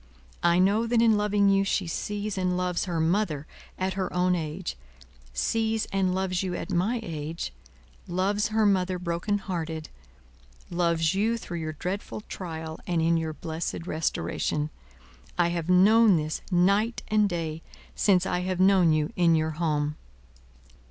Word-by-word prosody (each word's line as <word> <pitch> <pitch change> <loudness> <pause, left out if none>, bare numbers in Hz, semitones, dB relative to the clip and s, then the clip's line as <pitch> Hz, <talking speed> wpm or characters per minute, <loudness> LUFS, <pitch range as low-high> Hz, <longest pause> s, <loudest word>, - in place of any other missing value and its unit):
I 170 0 +4
know 205 +5 +3
that 235 0 +2
in 225 -1 +5
loving 205 -1 +2
you 195 0 +4
she 195 -1 0
sees 205 +4 -3
and 180 -1 0
loves 180 0 -1
her 175 -3 -2
mother 160 -3 0 0.3
at 185 0 -1
her 190 0 -2
own 180 +1 +2
age, 155 - -3 0.6
sees 220 - 0
and 190 -2 +1
loves 185 -1 0
you 185 -2 -2
at - - -5
my 205 +8 +1
age, 160 - -5 0.5
loves 195 +4 0
her 220 0 +2
mother 185 -2 +2
broken 180 +4 -1
hearted, 165 -5 -4 0.8
loves 170 -2 +1
you 220 +4 +1
through 175 -6 -6
your 155 -1 -4
dreadful 185 +7 -4
trial 160 -5 -6
and 175 -2 +1
in 165 +1 +3
your 160 -1 -1
blessed 160 +1 -4
restoration. 155 -2 -1 0.7
I 175 -1 +3
have 170 0 -3
known 205 +3 +6
this, 155 -1 -2
night 200 +6 +2
and 210 -1 +3
day, 165 -3 -3 0.3
since 185 -3 +3
I 180 - 0
have 180 0 -2
known 185 -3 +5
you 155 -1 0
in 170 -2 +4
your 160 0 +1
home." 150 -2 -1
180 Hz, 155 wpm, -27 LUFS, 165-200 Hz, 0.8 s, known